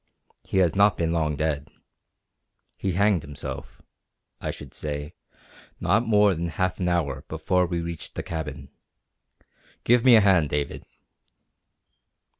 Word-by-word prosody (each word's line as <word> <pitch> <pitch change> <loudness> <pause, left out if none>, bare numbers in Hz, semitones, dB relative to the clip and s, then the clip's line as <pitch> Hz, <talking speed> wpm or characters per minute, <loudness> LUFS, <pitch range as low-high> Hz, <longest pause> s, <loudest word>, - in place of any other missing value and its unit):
He - - -3
has 90 -4 +3
not 100 0 +4
been 80 -1 0
long 80 -3 0
dead. 75 -1 -1 1.1
He 95 -2 -2
hanged 100 -1 +3
himself, 70 -2 -8 0.6
I - - -4
should 70 -3 -8
say, 75 0 -5 0.7
not 115 +1 +2
more 105 -2 +5
than 85 0 -3
half 90 +2 -2
an 90 -1 0
hour 70 -6 -1
before 90 +3 0
we 85 -1 -2
reached 85 -1 -7
the - - -4
cabin. 75 -4 -6 1.1
Give 120 0 +4
me 130 -2 +8
a 110 - +7
hand, 95 -7 +4
David!" 70 0 -3
85 Hz, 135 wpm, -25 LUFS, 75-95 Hz, 1.1 s, me